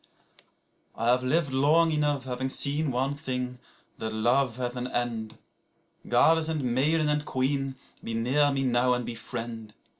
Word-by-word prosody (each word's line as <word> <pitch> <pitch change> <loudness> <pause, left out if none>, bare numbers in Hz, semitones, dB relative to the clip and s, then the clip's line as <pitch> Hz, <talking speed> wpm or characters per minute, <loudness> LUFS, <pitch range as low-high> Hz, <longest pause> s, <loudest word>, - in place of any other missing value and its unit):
1I 115 - -2
have 125 +1 +3
lived 140 +1 +1
long 155 +5 +4
enough, 145 -3 0
having 130 0 -3
seen 145 +3 0
one 130 +2 0
thing, 125 -4 -4 0.4
that 110 - -3
love 120 +3 +1
hath 125 -1 -3
an 125 0 -3
end;2Goddess 120 +5 -1
and 155 -3 -1
maiden 145 +6 +2
and 150 0 +1
queen, 135 0 -1 0.3
be 115 - -4
near 135 +6 +2
me 135 -1 0
now 125 0 +2
and 125 -1 -3
befriend. 115 -2 -6
130 Hz, 145 wpm, -27 LUFS, 120-145 Hz, 0.4 s, long